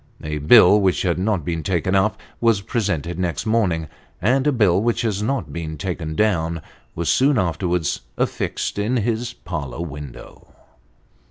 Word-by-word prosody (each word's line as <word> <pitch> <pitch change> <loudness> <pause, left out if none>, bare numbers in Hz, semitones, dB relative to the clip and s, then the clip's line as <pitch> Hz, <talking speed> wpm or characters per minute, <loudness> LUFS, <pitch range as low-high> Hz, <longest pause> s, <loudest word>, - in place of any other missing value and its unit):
A 75 0 -3
bill, 100 +5 +7
which 95 -2 +1
has 90 -3 +1
not 95 -5 0
been 85 0 -2
taken 95 +1 -1
up, 100 +2 +2 0.2
was 115 -4 +3
presented 90 - -2
next 90 -3 -2
morning; 95 -8 +1 0.3
and 130 +8 +2
a - - +4
bill, 100 -7 +3
which 120 +1 0
has 105 -3 -1
not 105 - -2
been 80 -2 -5
taken 80 -2 -4
down, 85 -6 0 0.3
was 85 0 -3
soon 135 - +3
afterwards 85 -2 0 0.2
affixed - - -2
in 115 +5 0
his 120 +1 -1
parlour 75 - -6
window. 75 -4 -10
95 Hz, 155 wpm, -21 LUFS, 80-110 Hz, 0.3 s, bill